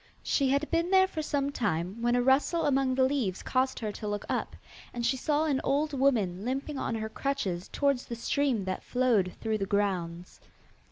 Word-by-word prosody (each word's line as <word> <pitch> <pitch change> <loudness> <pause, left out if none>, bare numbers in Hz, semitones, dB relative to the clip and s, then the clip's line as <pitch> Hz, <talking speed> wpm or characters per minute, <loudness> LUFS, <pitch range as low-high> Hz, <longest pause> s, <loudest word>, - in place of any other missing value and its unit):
She 275 -2 +1
had 280 +3 +1
been 335 +1 +1
there 380 0 +6
for 320 -4 -4
some 285 -2 -1
time, 195 - -2
when 240 +1 +2
a 245 - +2
rustle 275 +6 +3
among 270 -2 +2
the 260 - +3
leaves 260 -9 0
caused 260 +1 0
her 215 -2 -3
to 210 +1 -6
look 205 0 -3
up, - - -2 0.4
and 240 -1 -2
she 265 - +2
saw 295 +4 +1
an 280 -4 +1
old 290 +2 +1
woman 220 -9 +1
limping 270 +3 -3
on 230 - -2
her 220 0 -3
crutches 205 -8 -2
towards 280 -3 0
the 235 - -4
stream 240 -3 0
that 185 0 -3
flowed 235 -8 +1
through 220 -1 -1
the 195 - -2
grounds. 180 -4 -2
255 Hz, 200 wpm, -29 LUFS, 205-280 Hz, 0.4 s, there